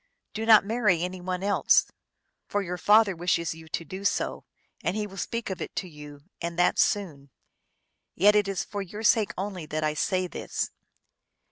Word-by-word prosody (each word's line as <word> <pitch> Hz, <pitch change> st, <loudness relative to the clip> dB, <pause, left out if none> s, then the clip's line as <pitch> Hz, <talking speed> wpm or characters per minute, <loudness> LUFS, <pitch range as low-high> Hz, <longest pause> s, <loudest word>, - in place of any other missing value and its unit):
Do 225 Hz, +1 st, -4 dB
not 220 Hz, -3 st, +8 dB
marry 210 Hz, -6 st, +2 dB
any 180 Hz, 0 st, -4 dB
one 185 Hz, +1 st, -3 dB
else. 200 Hz, 0 st, +4 dB, 0.6 s
For 205 Hz, 0 st, -1 dB
your 180 Hz, -1 st, -5 dB
father 210 Hz, 0 st, +5 dB
wishes 170 Hz, -1 st, 0 dB
you 160 Hz, 0 st, -13 dB
to 165 Hz, -, -4 dB
do 190 Hz, +5 st, -7 dB
so, 200 Hz, -, -1 dB, 0.4 s
and 180 Hz, -, 0 dB
he 215 Hz, -1 st, -1 dB
will 195 Hz, -2 st, -11 dB
speak 230 Hz, +3 st, -3 dB
of 190 Hz, -, -5 dB
it -, -, -6 dB
to 185 Hz, -, -3 dB
you, 150 Hz, -3 st, -12 dB, 0.2 s
and 170 Hz, 0 st, -4 dB
that 175 Hz, -, +3 dB
soon. 165 Hz, -, 0 dB, 0.9 s
Yet 205 Hz, +4 st, +5 dB
it 205 Hz, -1 st, +3 dB
is 195 Hz, -2 st, -2 dB
for 205 Hz, -1 st, -5 dB
your 205 Hz, +3 st, -7 dB
sake 215 Hz, -1 st, +3 dB
only 185 Hz, -4 st, -4 dB
that 155 Hz, +1 st, -3 dB
I 155 Hz, 0 st, +1 dB
say 185 Hz, +4 st, 0 dB
this." 180 Hz, -, -4 dB
185 Hz, 190 wpm, -27 LUFS, 170-205 Hz, 0.9 s, not